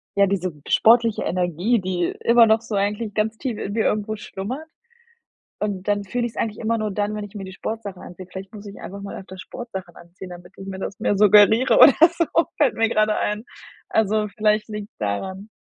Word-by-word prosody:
ja, 200 - +5
diese 185 -2 -1 0.2
sportliche 230 -1 +4
Energie, 180 +6 0
die 180 -2 -1 0.2
immer 235 0 +7
noch 220 0 +4
so 225 -2 -5
eigentlich 205 +2 -1
ganz 220 +1 -1
tief 245 -5 -4
in 195 - -4
mir 220 +1 0
irgendwo 215 +1 -1
schlummert 245 +12 -6 0.9
und 200 -2 -3
dann 205 -1 +1
fühle 240 +5 -2
ich's 225 - -9
eigentlich 215 -2 -2
immer 230 0 0
nur 215 -2 -2
dann, 205 +1 -1
wenn 210 - -4
ich 205 +1 -12
mir 200 - -6
die 190 - -9
Sportsachen 205 -1 -6
anziehe. 180 +1 -10
Vielleicht 190 +3 -9
muss 210 0 -10
ich 200 - -11
einfach 200 +1 -8
mal 200 - -7
öfter 190 0 -11
Sportsachen 190 -5 -8
anziehen, 180 +2 -12
damit 175 0 -11
ich 195 - -10
mir 190 -1 -6
das 190 - -6
mehr 205 - +1
suggeriere 210 +4 +6
oder 275 - +9 0.2
so, 335 - +2 0.3
fällt 275 -6 +3
mir 225 0 +2
gerade 215 -1 +2
ein. 210 +1 -1 0.5
Also, 215 0 +1
vielleicht 215 0 +1
liegt's 210 -1 -7
daran. 190 - -4
210 Hz, 205 wpm, -22 LUFS, 190-220 Hz, 0.9 s, oder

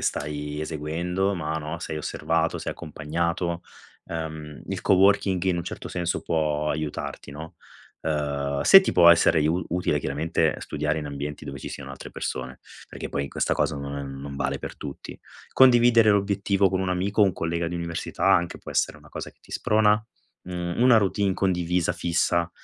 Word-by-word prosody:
stai 75 0 -3
eseguendo, 85 +6 -2
ma, 80 -3 -3
no, 80 +2 -5
sei 80 -2 -5
osservato, 80 +2 -1
sei - - -4
accompagnato. 85 +3 -3 0.4
Uhm, 80 -2 -6
il 95 -2 -3
co-working 95 -1 +3
in 90 -2 +1
un 85 - -4
certo - - -6
senso 85 -1 -2
può 75 -2 0
aiutarti, 75 -1 -4
no? 80 +3 -9 0.4
Uhm, 70 -2 -1
se 195 - +10
ti 190 - -1
può 85 -1 +8
essere 85 -1 +5
iu 80 +4 +1
utile, 85 -4 0
chiaramente, 75 +4 0
studiare 75 +1 -2
in 75 - -5
ambienti 70 +1 -5
dove 70 -1 -7
ci - - -7
siano 70 -1 -8
altre 70 - -9
persone. 65 0 -5 0.3
Perché - - -7
poi 70 - -1
in - - -6
questa - - -1
cosa - - 0
non 70 -1 -6
non 70 0 -7
vale 70 - -1
per - - -7
tutti. 70 -2 -8 0.3
Condividere 120 -3 +6
l'obiettivo 100 -1 +2
con 95 0 0
un 95 - -1
amico, 95 +4 0
un 95 - +4
collega 85 0 -2
di 85 - -5
università, 85 -1 -4
anche, 85 0 +3
può - - -10
essere - - 0
una - - -17
cosa - - -6
che - - -34
ti - - -19
sprona. 105 0 +3 0.4
Mhmm, 90 +3 -2
una 125 -3 +7
routine 100 -1 +1
condivisa 90 -2 0
fissa, 85 0 0
85 Hz, 175 wpm, -25 LUFS, 75-95 Hz, 0.4 s, se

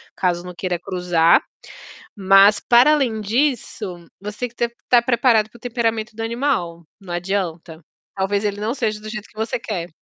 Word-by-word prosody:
caso 175 -2 0
não 180 - -8
queira 180 0 -3
cruzar. 180 -2 +2 0.8
Mas, 195 +1 +6
para 245 +5 +5
além 245 -7 0
disso, 215 - -2
você 205 +2 -8
tem 250 - -1
que 235 - -25
t 235 - 0 0.2
tá 245 -1 +5
preparado 235 -3 +3
para 235 - -16
o - - -34
temperamento 230 -2 -2
do 225 - -4
animal, 225 -8 -2 0.2
não 190 -3 -9
adianta. 175 -3 -3 0.3
Talvez 200 +1 -1
ele 205 -1 -1
não 220 +3 -1
seja 215 -5 -2
do 215 - -9
jeito 215 -2 -7
que - - -26
você 220 +2 -2
quer. 185 -7 -4
210 Hz, 180 wpm, -20 LUFS, 180-235 Hz, 0.8 s, Mas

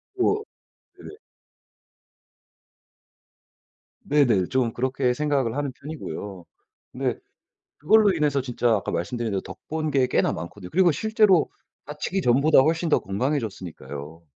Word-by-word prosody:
고 415 +3 +1 0.6
예. 410 - -11 2.9
네네. 135 - +3
좀 125 -3 0
그렇게 130 0 0
생각을 135 -4 0
하는 145 -2 -2
편이고요. 105 - -8 0.5
근데 - - -2 0.6
그걸로 210 +5 +4
인해서 150 -4 +1
진짜 125 -1 -1
아까 100 - -3
말씀드린 115 +6 -3
대로 95 -1 -1
덕 - - -11
본 155 -1 -2
게 130 -2 +2
꽤나 - - +1
많거든요. 90 +3 -7
그리고 180 0 +4
실제로 215 -2 +3 0.4
다치기 150 +6 -3
전보다 140 +3 +4
훨씬 165 +4 +2
더 - - +4
건강해졌으니까요. 95 - -4
135 Hz, 280 characters per minute, -24 LUFS, 110-155 Hz, 2.9 s, 그걸로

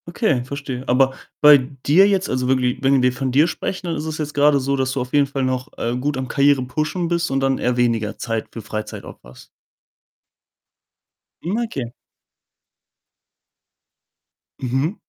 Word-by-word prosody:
Okay, 170 - 0
verstehe. 135 -1 -6
Aber 130 +1 +3 0.3
bei 150 -1 +9 0.3
dir 180 +8 +6
jetzt 195 -1 +1
also 125 -1 -1
wirklich, 125 -1 +1
wenn 135 0 +4
wir 125 0 +3
von 130 0 -2
dir 145 +6 +4
sprechen, 185 +2 -4
dann 165 - -2
ist 150 0 -4
es 155 -1 -4
jetzt 150 -1 -4
grade 145 0 +4
so, 135 +1 -1
dass 130 -1 -1
du 135 - -2
auf 125 0 -7
jeden 145 -1 +4
Fall 135 -1 -3
noch, 130 +1 -2
äh, 120 +1 -2
gut 140 +3 -2
am 130 0 -3
Karriere 140 0 +3
pushen 155 +6 -2
bist 170 0 0
und 135 0 0
dann 135 0 +1
eher 125 0 0
weniger 115 -3 0
Zeit 115 -2 -3
für 115 - -7
Freizeit 110 0 -6
auch - - -11
hast? - - -15 1.9
Hm, 185 +6 -2
okay. 130 - -5 2.7
Mhm. 135 - -1
135 Hz, 170 wpm, -20 LUFS, 125-150 Hz, 2.7 s, bei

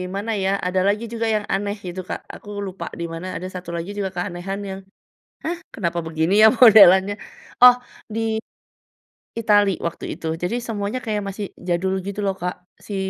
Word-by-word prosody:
mana 205 +3 -2
ya, 190 - +2 0.2
ada 185 +1 +1
lagi 205 +3 +1
juga 230 0 -1
yang 210 - 0
aneh 200 +1 -1
gitu, 180 +1 -5
Kak. - - -4 0.2
Aku 205 -1 -7
lupa 190 -1 -6
di 170 - -2
mana. 185 +3 -5
Ada 185 - -4
satu 180 - -12
lagi 170 +4 -4
juga 195 -2 -1
keanehan 180 +2 -4
yang, 190 0 -5 0.6
“Hah 340 +2 -2 0.2
kenapa 170 -4 -1
begini 160 +5 +1
ya - - +10
modelannya?” 205 -4 +8 0.4
Oh, 250 0 +10 0.3
di 220 0 -1 1.0
Itali 205 -3 +4
waktu 170 - -7
itu. 165 - -6
Jadi 180 +7 -1
semuanya 215 +1 -3
kayak 210 -2 -1
masih 200 0 -5
jadul 185 +2 -1
gitu 200 +1 -5
loh, 195 -1 +1
Kak. 180 0 -2 0.3
Si 205 - -4
195 Hz, 175 wpm, -22 LUFS, 180-210 Hz, 1.0 s, ya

